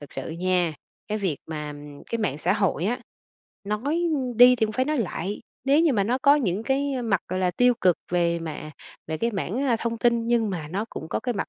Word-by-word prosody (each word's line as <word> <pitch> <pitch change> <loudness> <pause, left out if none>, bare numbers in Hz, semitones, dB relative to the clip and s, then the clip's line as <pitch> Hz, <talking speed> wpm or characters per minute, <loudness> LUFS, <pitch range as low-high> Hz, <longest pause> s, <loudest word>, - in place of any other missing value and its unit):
Thực 145 - -12
sự 135 - -5
nha, 175 -1 0 0.3
cái 215 0 -1
việc 185 -8 -1
mà, 150 -2 -5
ừm, 145 0 -11
cái 230 - -3
mạng 150 -10 -1
xã 180 +4 +1
hội 195 -5 0
á, 245 +5 0 0.6
nói, 250 +11 -1
ưm, 255 -5 -2
đi 250 +1 +8
thì 220 -2 +2
cũng 215 - -5
phải 255 +3 +1
nói 300 -1 0
lại, 200 -1 -3 0.2
nếu 280 +3 +4
như 325 -4 +4
mà 200 -4 +2
nó 250 +4 +1
có 280 +2 +6
những 210 -7 0
cái, 275 +2 0
a, 250 - -2
mặt, 205 -5 +1
gọi 185 +1 -2
là, 180 - +2
tiêu 245 +7 +3
cực 180 -2 +4
về 170 -1 +2
mả 155 -2 -6 0.4
về 160 0 -3
cái 235 - 0
mảng, 210 +5 -2
a, 245 -4 +2
thông 230 0 -3
tin 240 0 +3
thì 230 - -5
nhưng 235 -3 +2
mà 160 -5 -4
nó 200 +6 -2
cũng 160 - -7
có - - -2
cái 245 -2 -2
mặt - - -3
210 Hz, 255 wpm, -25 LUFS, 170-245 Hz, 0.6 s, đi